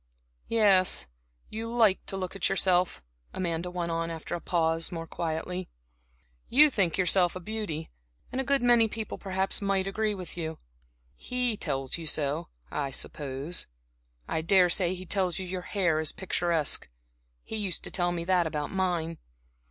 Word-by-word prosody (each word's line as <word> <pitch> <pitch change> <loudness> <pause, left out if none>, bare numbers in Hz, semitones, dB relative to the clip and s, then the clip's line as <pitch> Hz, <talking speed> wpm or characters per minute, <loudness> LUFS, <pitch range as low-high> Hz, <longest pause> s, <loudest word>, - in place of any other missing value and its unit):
"Yes, 200 -5 +5 0.5
you 225 +1 -4
like 230 -4 +3
to 195 - -2
look 185 0 -4
at 195 - +1
yourself." 180 - +2 0.3
Amanda 175 -1 -2
went 175 -1 -3
on 165 0 -1
after 165 0 -6
a 175 - -3
pause, 165 0 0
more 165 -1 -5
quietly, 170 +3 -4 0.8
"you 295 +4 +7
think 185 -9 +1
yourself 180 -1 +3
a - - -4
beauty, 185 -6 -4 0.4
and 260 - -1
a - - -2
good 275 0 +1
many 240 -2 +5
people, 220 0 -5
perhaps, 190 0 -1
might 195 -1 +1
agree 210 +2 -1
with 185 -2 -7
you. 160 -2 -4 0.6
He 250 - -1
tells 135 -6 -3
you 165 - -6
so, 150 +2 -1 0.2
I 140 -2 -2
suppose. 140 +3 -2 0.6
I 160 - -1
daresay 180 +1 +4
he 185 0 -9
tells 185 -2 +1
you 190 - -4
your 180 0 -4
hair's 170 -6 0
picturesque 170 -5 0 0.5
he - - -6
used 200 -4 -3
to - - -3
tell 175 -1 +1
me 170 -1 -3
that 180 -1 +2
about 150 -2 -3
mine. 175 -4 -1
180 Hz, 160 wpm, -28 LUFS, 165-195 Hz, 0.8 s, you